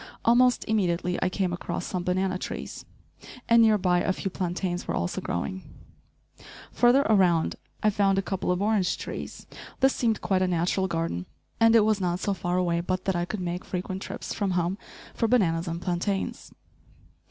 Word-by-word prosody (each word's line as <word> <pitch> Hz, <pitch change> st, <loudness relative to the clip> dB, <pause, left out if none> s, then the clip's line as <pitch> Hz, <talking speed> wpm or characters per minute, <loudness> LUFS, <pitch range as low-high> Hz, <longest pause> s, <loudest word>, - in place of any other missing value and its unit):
Almost 245 Hz, +2 st, +4 dB
immediately 180 Hz, -4 st, 0 dB
I 185 Hz, -, +2 dB
came 185 Hz, -1 st, -1 dB
across 175 Hz, 0 st, -4 dB
some 180 Hz, -1 st, -3 dB
banana 185 Hz, +1 st, 0 dB
trees, -, -, -6 dB, 0.6 s
and 230 Hz, 0 st, +6 dB
near 220 Hz, -2 st, +5 dB
by 180 Hz, -2 st, +2 dB
a -, -, +1 dB
few 190 Hz, 0 st, -3 dB
plantains 180 Hz, -1 st, -3 dB
were -, -, -1 dB
also 85 Hz, -, -2 dB
growing. 190 Hz, -, -3 dB, 1.1 s
Further 250 Hz, +3 st, +4 dB
around 180 Hz, -, +3 dB, 0.3 s
I 215 Hz, -, +4 dB
found 195 Hz, -1 st, +2 dB
a 195 Hz, -, +1 dB
couple 190 Hz, -1 st, -2 dB
of 180 Hz, +2 st, 0 dB
orange 205 Hz, -4 st, +1 dB
trees. -, -, -7 dB, 0.3 s
This 265 Hz, 0 st, +4 dB
seemed 225 Hz, -3 st, 0 dB
quite 190 Hz, -1 st, 0 dB
a 185 Hz, -, +2 dB
natural 180 Hz, +2 st, +1 dB
garden, 165 Hz, -, -2 dB, 0.3 s
and 225 Hz, 0 st, +6 dB
it 220 Hz, -2 st, +6 dB
was 215 Hz, -2 st, +1 dB
not 175 Hz, -1 st, 0 dB
so 200 Hz, -, 0 dB
far 175 Hz, -1 st, -2 dB
away 170 Hz, -2 st, +1 dB
but 185 Hz, +1 st, -2 dB
that 190 Hz, -, 0 dB
I 175 Hz, 0 st, 0 dB
could 200 Hz, +2 st, -5 dB
make 180 Hz, +1 st, -3 dB
frequent 185 Hz, +1 st, -4 dB
trips -, -, -6 dB
from 190 Hz, -3 st, -1 dB
home 175 Hz, +4 st, -1 dB, 0.3 s
for 230 Hz, -, 0 dB
bananas 180 Hz, -8 st, +2 dB
and 165 Hz, 0 st, -3 dB
plantains. 185 Hz, +2 st, -2 dB
185 Hz, 180 wpm, -26 LUFS, 175-205 Hz, 1.1 s, and